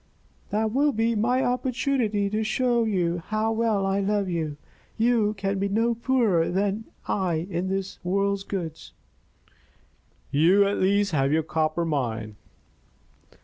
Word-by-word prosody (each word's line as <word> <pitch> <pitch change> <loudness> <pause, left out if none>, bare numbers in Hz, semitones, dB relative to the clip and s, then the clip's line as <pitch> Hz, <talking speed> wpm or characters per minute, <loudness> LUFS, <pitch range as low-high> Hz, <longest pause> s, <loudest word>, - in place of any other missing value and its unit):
"That 215 +1 0
will 290 +3 +3
be 225 +1 +1
my 245 +4 +1
opportunity 250 -4 0
to 215 +1 0
show 215 -7 +1
how 215 +5 -1
well 220 -3 +1
I 195 +1 +1
love 200 0 0
you. 160 -4 -3 0.4
You 225 -2 +2
can 195 0 -2
be 200 +1 0
no 225 +4 +1
poorer 230 -8 +1
than 200 +4 -1 0.2
I 175 -4 0
in 185 +2 -2
this 195 0 -4
world's 200 +2 0
goods." 170 -6 -6 1.4
"You 180 +8 +5
at 200 +1 0
least 200 +1 +2
have 135 -3 +1
your 160 +1 +2
copper 160 +1 -1
mine." 115 -8 -2
200 Hz, 135 wpm, -25 LUFS, 175-225 Hz, 1.4 s, You